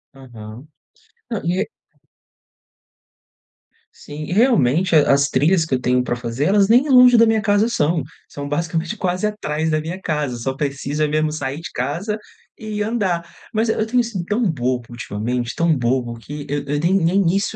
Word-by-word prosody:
Aham. 120 -1 -11 0.6
Não, 225 -7 -4
e 180 +3 0
é 215 - -3 2.3
Sim, 150 +1 -8
realmente 185 - +3
a 150 -2 +5
as 140 0 +2
trilhas 160 +6 +2
que 140 - 0
eu - - -1
tenho 125 0 +1
para 120 - -2
fazer 120 +3 -3
elas 195 +2 +4
nem 250 +7 +4
longe 250 -2 +7
da 230 0 +6
minha 220 -1 +2
casa 205 +2 +2
são. 160 -6 +1 0.3
São 145 0 -7
basicamente 165 +5 -2
quase 185 +1 -1
atrás 160 -7 -2
da 155 0 +1
minha 170 +5 -6
casa, 150 -7 -2
só 130 +3 -3
precisa 145 +2 -2
mesmo 155 +1 0
sair 145 -1 -4
de 165 - -8
casa 170 - -3 0.4
e 215 -2 -5
andar. 205 -6 -1 0.3
Mas, 220 +1 +1
eh, - - 0
eu 220 - +1
tenho 245 +2 +2
sido 220 -6 -4
tão 210 +6 -1
bobo 125 -4 -2
ultimamente, 120 +1 -3
tão 165 -2 +2
bobo 120 -1 -1
que 145 +5 -8
eu 145 0 -2
eu 145 +1 -1
nem 170 +5 +1
nem 185 0 +2
isso 200 +2 -1
155 Hz, 180 wpm, -20 LUFS, 135-205 Hz, 2.3 s, longe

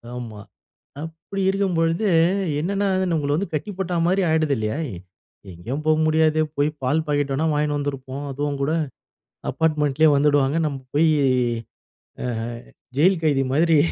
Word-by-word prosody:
ஆமா 115 -4 -7 0.6
அப்டி 165 +5 -6
இருக்கும்பொழுது, 185 -1 +1 0.5
என்னன்னா 200 +5 0
அது 190 0 +1
நம்மள 145 -2 0
வந்து 195 +5 -2
கட்டி 155 +6 -3
போட்டா 180 -2 -1
மாதிரி 190 +2 +2
ஆயிடுது 155 -2 +2
இல்லயா? 110 +6 -2 0.7
எங்கேயும் 125 - -5
போக 155 0 +4
முடியாது. 155 0 +3 0.2
போய் 145 +1 +2
பால் 145 +5 +1
பாக்கெட் 145 -1 0
வேணா 155 +4 0
வாங்கினு 150 0 0
வந்துருப்போம். 140 -1 -4
அதுவும் 145 +1 -2
கூட, 145 - +1 0.8
அப்பார்ட்மெண்ட்லயே 155 -1 +2
வந்துடுவாங்க. 145 0 +3
நம்ம 140 -2 -3 0.2
போய் 160 +2 +4 1.2
அ - - -2 0.7
ஜெயில் 175 +3 +4
கைதி 140 -3 +2
மாதிரி 160 +2 +4
150 Hz, 135 wpm, -22 LUFS, 140-165 Hz, 1.2 s, போக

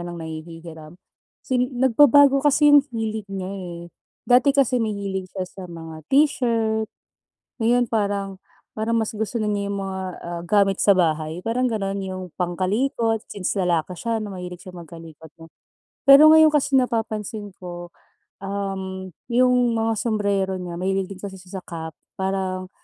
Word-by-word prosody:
lang 175 - -7
nanghihihiram. 160 0 -9 0.5
Sin 250 -2 0
nagbabago 275 +2 +5
kasi 290 +1 +4
'yong 290 - +9 0.2
hilig 220 -2 -3
niya, 195 -1 -5
eh, 175 -3 -7 0.4
dati 270 +3 +4
kasi 255 -3 +3
mahilig 200 -3 -3
siya 185 - -1
sa 185 +1 -11
mga 165 -1 -9
t-shirt, 230 -6 +2 0.7
ngayon 245 +2 +3
parang 200 -3 -2 0.3
parang 225 +1 -1
mas 220 0 -1
gusto 220 +2 -3
na 215 - -1
niya 200 -1 -1
'yong 200 - -2
mga, 190 0 -4 0.2
ah, 170 0 -5
gamit 200 -2 +3
sa 200 -2 +5
bahay, 160 +1 -1
parang 250 +2 +1
gano'n, 200 -3 -2
'yong 185 -2 -6
pangkalikot, 210 +6 -1
since 190 -3 -3
lalaki 180 -3 0
siya, 230 +5 -2
na 210 -2 -5
mahilig 180 0 -8
siya 185 - -10
magkalikot, 165 -2 -12
'no? 165 0 -15 0.5
Pero 275 +2 +9
ngayon 315 0 +7
kasi 290 -2 +1
napapansin 220 -5 -1
ko, 175 -1 -8 0.5
uhm, 190 -1 -5 0.2
'yong 245 -1 +3
mga 225 -1 0
sumbrero 200 -4 0
niya, 180 -2 -6
mahilig 190 +1 -1
din 190 - -8
kasi 195 -1 -7
siya 185 +1 -9
sa - - -30
cap, 160 -2 -6 0.2
parang 190 -1 -2
200 Hz, 150 wpm, -23 LUFS, 180-230 Hz, 0.7 s, yong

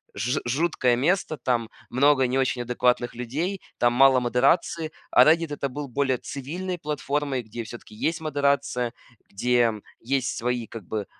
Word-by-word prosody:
ж 125 +4 -1
жуткое 130 -1 +1
место, 155 +4 0
там 120 -3 -1 0.2
много 135 +1 +4
не 125 +1 0
очень 130 -2 0
адекватных 125 0 +1
людей, 150 +11 -3 0.2
там 120 0 +3
мало 135 +1 +6
модерации. 140 +6 +1 0.2
А - - +7
"Реддит"- 165 0 +3
это 140 -1 -2
был 145 +2 -5
более 130 0 0
цивильной 175 +9 -5
платформой, 145 -3 -2
где 115 +2 -7
всё-таки 115 0 -11
есть 160 +9 -1
модерация, 140 -5 0 0.4
где 120 +2 +2 0.3
есть 130 +1 -1
свои 120 0 -1
как 115 -3 -9
бы 105 +2 -3
130 Hz, 150 wpm, -25 LUFS, 120-145 Hz, 0.4 s, А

